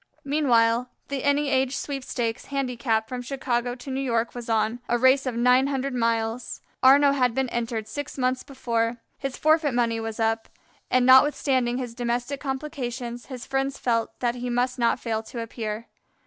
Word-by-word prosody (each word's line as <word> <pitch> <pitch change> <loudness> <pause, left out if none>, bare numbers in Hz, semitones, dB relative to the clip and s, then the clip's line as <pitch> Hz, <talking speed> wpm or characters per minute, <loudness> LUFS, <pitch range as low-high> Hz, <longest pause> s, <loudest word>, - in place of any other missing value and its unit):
Meanwhile 245 -4 +2 0.2
the 275 -2 -3
"Any 285 0 +2
Age 265 0 +1
Sweepstakes" 250 -4 -3
handicap 245 -5 -1
from 250 +1 -4
Chicago 245 -2 -2
to 260 +2 -8
New 265 +1 -1
York 235 -3 0
was 240 -1 -7
on, 225 +1 +1
a 240 - +3
race 260 +2 +4
of 250 - -2
nine 250 +3 +4
hundred 275 -1 -2
miles. 230 0 -1 0.2
Arnaux 280 +2 +7
had 250 -4 +1
been 265 -1 0
entered 230 -2 -3
six 290 +6 -6
months 255 0 0
before. 235 -4 -2 0.2
His 275 -2 -4
forfeit 310 -4 +3
money 230 -2 +1
was 225 0 -5
up, 225 0 0 0.4
and 255 -1 +3
notwithstanding 260 -2 +4
his 245 -3 -4
domestic 245 +3 -2
complications, 255 -4 -4
his 255 -3 -7
friends 270 0 -1
felt 230 -2 -1
that 240 -1 +1
he 245 0 -4
must 250 +1 0
not 235 +1 +2
fail 225 -2 -2
to 230 +2 -8
appear. 225 -1 -5
250 Hz, 170 wpm, -25 LUFS, 235-270 Hz, 0.4 s, Arnaux